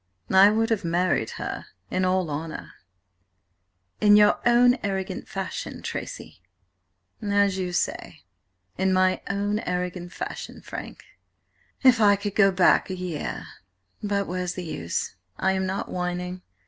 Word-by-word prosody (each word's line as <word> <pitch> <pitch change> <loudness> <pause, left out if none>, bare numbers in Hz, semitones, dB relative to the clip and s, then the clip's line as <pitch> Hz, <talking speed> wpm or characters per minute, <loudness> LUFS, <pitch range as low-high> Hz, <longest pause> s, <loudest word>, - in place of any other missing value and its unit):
"I 190 +2 +8
would 225 +2 +1
have 220 -4 +1
married 170 -8 +1
her - - -5 0.2
in 185 0 +1
all 185 -3 +1
honour—" 155 +2 -5 1.3
"In 210 -1 +6
your 210 0 +5
own 245 +1 +5
arrogant 195 -2 -3
fashion, - - -5
Tracy." - - -6 0.8
"As 200 -2 +2
you 180 -1 -2
say–in 95 - -4
my 185 0 +3
own 205 +1 0
arrogant 180 -3 -3
fashion, - - -6
Frank. - - -8 0.8
If 255 -3 +6
I 205 -1 +6
could 200 0 -4
go 195 -2 +5
back 185 0 +4
a 190 - -3
year–but 180 - -5
where's 180 0 -3
the 180 - -4
use? 85 - -3 0.2
I 190 - +2
am 190 0 0
not 190 +2 -3
whining. 180 0 -3
185 Hz, 130 wpm, -25 LUFS, 180-205 Hz, 1.3 s, I